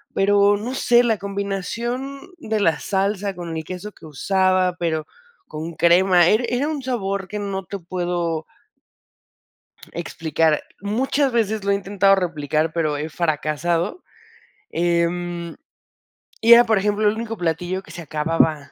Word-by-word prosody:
pero 200 +1 +4
no 240 +5 -5
sé, 245 -2 +4
la 225 -4 +1
combinación 200 +7 -3 0.2
de 220 -6 -2
la 165 -6 +2
salsa 200 0 -1
con 170 -2 -6
el 160 - -3
queso 185 +5 -7
que 160 - -14
usaba, 185 +4 +1
pero 160 -3 -1 0.4
con 160 +2 -6
crema 175 +1 +5
era 215 +5 +3
era 250 +5 0
un 305 -3 -3
sabor 200 -7 -2
que 210 - -5
no 195 -2 -3
te 200 +4 -5
puedo 175 -2 -3 1.5
explicar. 160 -2 0 0.2
Muchas 260 +6 0
veces 220 -3 0
lo 200 - +1
he - - +3
intentado 195 0 +3
replicar, 155 -4 -1
pero 155 -3 0
he 155 +2 -4
fracasado. 165 - -1 0.7
Em, 170 0 -1 0.9
y 230 +1 +8
era, 240 +1 +9
por 220 -2 +2
ejemplo, 210 +2 +1
el 210 - +2
único 225 0 -5
platillo 175 +2 -2
que 160 - -14
se 170 - -8
acababa 155 -1 0
185 Hz, 145 wpm, -22 LUFS, 165-210 Hz, 1.5 s, era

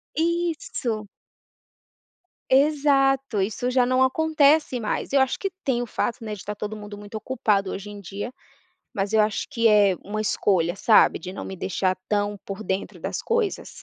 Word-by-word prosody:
Isso. 320 -10 -1 1.4
Exato, 270 -4 +3
isso 225 +5 -1
já 250 -1 +3
não 255 +1 +3
acontece 300 -1 +3
mais. 215 - -3
Eu 275 - +5
acho 265 - +1
que 390 - -1
tem 245 -3 0
o 240 - -4
fato, 235 +1 -2
né, 215 -1 -4
de 210 - -8
estar 210 - -5
todo 210 +1 -5
mundo 205 0 -9
muito 205 +1 -10
ocupado 210 -4 0
hoje 200 +1 -6
em 205 0 -9
dia, 200 +5 -6 0.6
mas 200 +2 -2
eu 220 - +5
acho 210 -1 -1
que 230 -1 +3
é 205 -3 +5
uma 215 +2 -4
escolha, 185 -5 +1
sabe. 215 +2 +5
De 185 - -8
não - - -7
me 190 - -6
deixar 185 +1 -1
tão 205 0 0
por 200 +2 -6
dentro 190 +1 -3
das - - -4
coisas. 460 -4 -1
220 Hz, 175 wpm, -24 LUFS, 205-270 Hz, 1.4 s, Eu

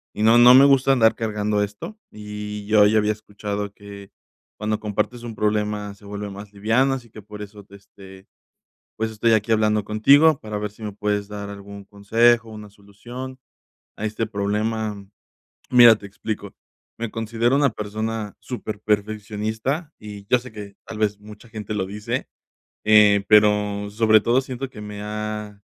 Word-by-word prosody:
y 105 - -4
no 115 +2 +6
no 120 +1 +8
me 135 +2 +8
gusta 135 -1 +5
andar 115 -4 +4
cargando 105 -2 -1
esto. 105 - -6
Y 105 0 -7
yo 105 -1 +5
ya 110 +1 +3
había 105 0 +1
escuchado 105 -1 -5
que 100 -1 -12 0.5
cuando 105 0 -2
compartes 110 +3 -3
un 115 -2 -7
problema 105 -1 -1
se 105 - -19
vuelve 105 0 -6
más 100 +1 -10
liviano. 115 +7 +2
Así 120 -3 -6
que 110 - -12
por 105 +1 -10
eso 105 0 -10
te, 100 0 -16
este, 95 -1 -15 0.7
pues, 110 0 -2
estoy 110 +1 +1
aquí 110 +1 +1
hablando 105 -1 +2
contigo 140 +9 +5
para 105 -1 -6
ver 105 0 -4
si 105 +2 -17
me 105 - -4
puedes 105 0 -2
dar 105 -1 -7
algún 100 0 -10
consejo, 115 +3 +2
una 105 -1 -10
solución 120 +6 -10 0.6
a 110 - -4
este 110 +1 -2
problema. 105 +1 -2 0.7
Mira, 120 -2 +8
te 105 - -12
explico. 105 +2 -6 0.4
Me 115 -1 -4
considero 115 +3 0
una 140 -1 +3
persona 110 0 -4
superperfeccionista 110 - -3
y 105 -2 -10
yo 125 - +4
sé 125 0 -12
que 100 -2 -9
tal 110 - -8
vez, 105 -1 0
mucha 105 +2 -14
gente 110 -1 -6
lo 100 -3 -1
dice, 105 +2 -4 0.6
eh, 105 -2 +5
pero 105 -1 +3
sobre 110 0 +4
todo 120 +5 +2
siento 130 0 -6
que 110 - -11
me 105 -1 -8
ha 105 -1 -5
105 Hz, 170 wpm, -22 LUFS, 105-115 Hz, 0.7 s, no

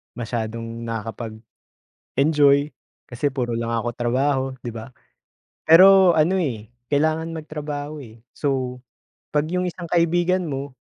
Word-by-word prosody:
masyadong 115 0 -4 1.1
nakakapag-enjoy. 145 0 +2 0.4
Kasi 125 +4 -1
puro 120 -3 -2
lang 115 0 -3
ako 115 +1 -1
trabaho 130 +3 0 0.2
'di 120 -2 -6
ba? 115 +1 -8 0.8
Pero 185 +2 +8
ano, 170 +5 +3
eh, 120 - -3 0.2
kailangan 160 +3 0
magtrabaho, 150 -1 -6
eh. 115 -3 -13
So, 130 -3 -2 0.5
'pag 150 0 +1
yung 180 0 0
isang 175 0 -8
kaibigan 175 +2 +1
mo 140 -1 -5
145 Hz, 115 wpm, -22 LUFS, 120-160 Hz, 1.1 s, Pero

